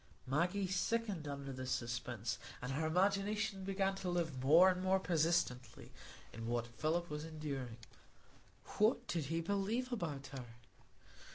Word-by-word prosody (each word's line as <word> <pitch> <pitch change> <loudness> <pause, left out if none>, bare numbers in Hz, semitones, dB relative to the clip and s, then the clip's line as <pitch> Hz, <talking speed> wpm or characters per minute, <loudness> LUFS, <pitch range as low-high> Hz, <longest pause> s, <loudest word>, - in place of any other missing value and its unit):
Maggie 175 +9 +1
sickened 190 -2 0
under 140 -1 -4
this 130 0 -5
suspense, 120 -1 -2 0.2
and 125 +2 -4
her 155 +4 0
imagination 200 +3 +1
began 195 0 +1
to 185 - -3
live 165 -7 -1
more 165 +7 +8
and 180 0 -3
more 190 +1 +3
persistently 160 -7 0 0.4
in 115 +1 -5
what 120 0 0
Philip 155 +9 -1
was 150 -1 -4
enduring. 145 -7 -5 1.0
What 215 +4 +4
did 170 -4 -1
he 165 +4 -1
believe 200 +8 0
about 150 - -3
her? 130 -2 -5
165 Hz, 140 wpm, -37 LUFS, 135-190 Hz, 1.0 s, more